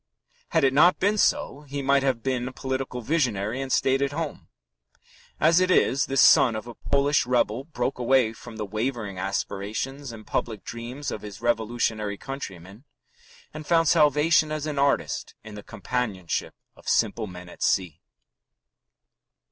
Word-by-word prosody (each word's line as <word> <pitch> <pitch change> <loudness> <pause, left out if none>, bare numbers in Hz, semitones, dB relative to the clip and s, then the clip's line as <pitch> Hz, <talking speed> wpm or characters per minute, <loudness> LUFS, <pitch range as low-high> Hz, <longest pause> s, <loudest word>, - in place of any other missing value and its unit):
Had 160 -3 +2
it 135 -1 +4
not 165 +6 +5
been 205 +3 +2
so, 140 - +1
he 140 0 -4
might 140 +1 +3
have 130 -4 0
been 130 -2 -1
a - - -5
political 130 -1 -4
visionary 120 -4 0
and 135 -1 -5
stayed 135 +1 +2
at 140 0 0
home. 160 -1 -5 0.9
As 165 +3 +5
it 185 0 +2
is, 140 -6 +3
this 135 0 +2
son 120 -4 +6
of 110 - -5
a 120 - -8
Polish 140 +2 +1
rebel 125 0 +1
broke 130 -5 -3
away 125 -2 +3
from 115 0 -11
the 105 - -3
wavering 110 -2 -3
aspirations 105 +8 -3
and 110 -2 -11
public 110 -4 -3
dreams 120 +5 -6
of 105 - -5
his 105 -2 -9
revolutionary 110 -3 -1
countrymen, 100 -6 -8 0.7
and 155 -1 -8
found 165 -1 +3
salvation 150 0 +4
as 155 -1 -3
an 150 -2 -3
artist 140 0 0
in 110 -1 -10
the 105 - -8
companionship 100 -5 -3 0.2
of - - -8
simple 110 0 +1
men 90 -1 -10
at - - -14
sea. 85 -4 0
125 Hz, 160 wpm, -25 LUFS, 110-140 Hz, 0.9 s, son